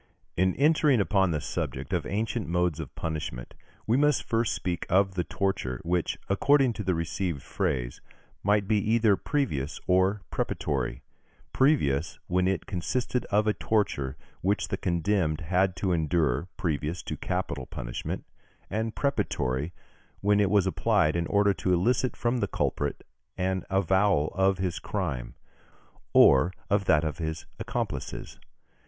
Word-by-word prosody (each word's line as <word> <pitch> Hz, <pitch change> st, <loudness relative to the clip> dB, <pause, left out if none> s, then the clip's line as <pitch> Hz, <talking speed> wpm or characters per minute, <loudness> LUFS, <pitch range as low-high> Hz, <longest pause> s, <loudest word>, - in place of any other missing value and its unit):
In 95 Hz, +1 st, +2 dB
entering 150 Hz, -3 st, +4 dB
upon 95 Hz, 0 st, +2 dB
the 80 Hz, -3 st, 0 dB
subject 70 Hz, +4 st, -4 dB
of 80 Hz, -4 st, 0 dB
ancient 110 Hz, +3 st, -2 dB
modes 90 Hz, -2 st, 0 dB
of 75 Hz, -5 st, -7 dB
punishment, 75 Hz, -6 st, -4 dB, 0.3 s
we 115 Hz, +3 st, +2 dB
must 150 Hz, -1 st, +3 dB
first 115 Hz, -1 st, 0 dB
speak 90 Hz, -2 st, -3 dB
of 95 Hz, +1 st, +3 dB
the 90 Hz, -1 st, -1 dB
torture, 85 Hz, -11 st, -2 dB
which, 85 Hz, 0 st, 0 dB
according 135 Hz, +5 st, +3 dB
to 105 Hz, -, -5 dB
the 95 Hz, -2 st, +1 dB
received 85 Hz, -, -2 dB
phrase, -, -, -2 dB, 0.4 s
might 100 Hz, 0 st, +2 dB
be 110 Hz, 0 st, +3 dB
either 110 Hz, 0 st, +3 dB
previous 85 Hz, -, -2 dB
or 95 Hz, +2 st, +2 dB
preparatory: 70 Hz, -5 st, -2 dB, 0.5 s
previous, 85 Hz, -, +2 dB
when 90 Hz, +1 st, +1 dB
it 95 Hz, -4 st, -1 dB
consisted 120 Hz, +7 st, -2 dB
of 105 Hz, +1 st, +2 dB
a 105 Hz, -, +2 dB
torture 70 Hz, -14 st, -1 dB, 0.2 s
which 100 Hz, +3 st, 0 dB
the -, -, 0 dB
condemned 85 Hz, -3 st, 0 dB
had 90 Hz, +3 st, +1 dB
to 90 Hz, +1 st, -1 dB
endure 80 Hz, -2 st, +1 dB
previous 80 Hz, -2 st, -2 dB
to -, -, -4 dB
capital 65 Hz, -2 st, -3 dB
punishment; -, -, -5 dB, 0.5 s
and 110 Hz, +1 st, -2 dB
preparatory, 70 Hz, -, -1 dB, 0.5 s
when 105 Hz, +1 st, +3 dB
it 100 Hz, -2 st, +3 dB
was 100 Hz, -1 st, +4 dB
applied 90 Hz, -2 st, +2 dB
in 85 Hz, -1 st, 0 dB
order 100 Hz, -1 st, +3 dB
to 95 Hz, -, -1 dB
elicit 120 Hz, +8 st, +1 dB
from 120 Hz, +1 st, 0 dB
the 100 Hz, -, 0 dB
culprit 70 Hz, -5 st, -2 dB, 0.3 s
an 95 Hz, -1 st, -1 dB
avowal 95 Hz, -4 st, +2 dB
of 95 Hz, 0 st, +2 dB
his 90 Hz, -2 st, -2 dB
crime, -, -, -3 dB, 0.8 s
or 70 Hz, +6 st, +6 dB, 0.2 s
of 100 Hz, -1 st, +2 dB
that 75 Hz, -3 st, +4 dB
of 80 Hz, +1 st, -3 dB
his 80 Hz, 0 st, -3 dB
accomplices. -, -, -4 dB
95 Hz, 145 wpm, -28 LUFS, 80-105 Hz, 0.8 s, or